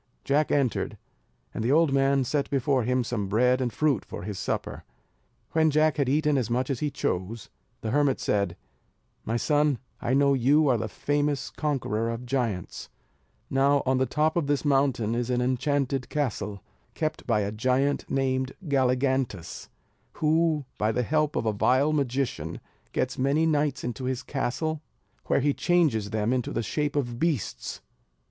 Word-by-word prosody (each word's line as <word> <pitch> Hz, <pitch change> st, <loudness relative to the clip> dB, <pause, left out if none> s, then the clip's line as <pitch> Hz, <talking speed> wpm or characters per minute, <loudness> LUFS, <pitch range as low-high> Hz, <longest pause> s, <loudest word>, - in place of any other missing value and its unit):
Jack 145 Hz, +2 st, +1 dB
entered, 135 Hz, -5 st, 0 dB, 0.6 s
and 110 Hz, -, -3 dB
the 120 Hz, -, +1 dB
old 155 Hz, -1 st, +4 dB
man 135 Hz, 0 st, +3 dB
set 140 Hz, +3 st, -1 dB
before 135 Hz, -1 st, +1 dB
him 125 Hz, +2 st, +1 dB
some 110 Hz, -4 st, -2 dB
bread 125 Hz, +5 st, +3 dB
and 125 Hz, -2 st, 0 dB
fruit 145 Hz, -3 st, +1 dB
for -, -, -8 dB
his 100 Hz, -1 st, -5 dB
supper. -, -, -3 dB, 0.7 s
When 160 Hz, -1 st, +3 dB
Jack 155 Hz, +1 st, +2 dB
had 140 Hz, -3 st, +1 dB
eaten 150 Hz, 0 st, +2 dB
as 120 Hz, -, -2 dB
much 125 Hz, +3 st, 0 dB
as 130 Hz, -, -2 dB
he 150 Hz, -, 0 dB
chose, 105 Hz, -4 st, -3 dB, 0.3 s
the 110 Hz, -, -3 dB
hermit 145 Hz, 0 st, +2 dB
said, 100 Hz, -4 st, 0 dB, 0.7 s
"My 115 Hz, +2 st, 0 dB
son, 145 Hz, +1 st, +2 dB, 0.2 s
I 125 Hz, +1 st, +1 dB
know 140 Hz, 0 st, +4 dB
you 140 Hz, +4 st, +4 dB
are 125 Hz, -, +3 dB
the 110 Hz, -, -2 dB
famous 145 Hz, +5 st, -1 dB
conqueror 120 Hz, -7 st, -1 dB
of 115 Hz, +2 st, -5 dB
giants; 120 Hz, -8 st, -3 dB, 0.6 s
now, 140 Hz, +1 st, +3 dB
on 130 Hz, 0 st, +2 dB
the 130 Hz, -, +1 dB
top 155 Hz, +1 st, +1 dB
of 170 Hz, -5 st, 0 dB
this 145 Hz, +1 st, 0 dB
mountain 135 Hz, -6 st, +2 dB
is 120 Hz, +1 st, -1 dB
an 125 Hz, -1 st, +1 dB
enchanted 130 Hz, +1 st, 0 dB
castle, 105 Hz, -, -2 dB, 0.3 s
kept 155 Hz, -1 st, -3 dB
by 110 Hz, -4 st, +2 dB
a 100 Hz, 0 st, -2 dB
giant 130 Hz, +6 st, 0 dB
named 130 Hz, -1 st, 0 dB
Galligantus, 130 Hz, -, 0 dB, 0.4 s
who, 155 Hz, -1 st, +1 dB
by 105 Hz, +1 st, +2 dB
the 125 Hz, +2 st, 0 dB
help 150 Hz, +3 st, +1 dB
of -, -, -1 dB
a 110 Hz, -, +1 dB
vile 130 Hz, +8 st, +2 dB
magician, 135 Hz, -2 st, -1 dB, 0.3 s
gets 130 Hz, 0 st, -2 dB
many 140 Hz, +5 st, +2 dB
knights 150 Hz, -3 st, +1 dB
into 125 Hz, +2 st, -4 dB
his 130 Hz, -1 st, -2 dB
castle, 150 Hz, +4 st, -2 dB, 0.5 s
where -, -, +2 dB
he 145 Hz, +1 st, +2 dB
changes 150 Hz, -, +2 dB
them 110 Hz, +2 st, 0 dB
into 125 Hz, -2 st, -1 dB
the 115 Hz, -, -1 dB
shape 150 Hz, +5 st, -2 dB
of 120 Hz, -4 st, -2 dB
beasts. 140 Hz, -, -2 dB
130 Hz, 165 wpm, -27 LUFS, 120-145 Hz, 0.7 s, old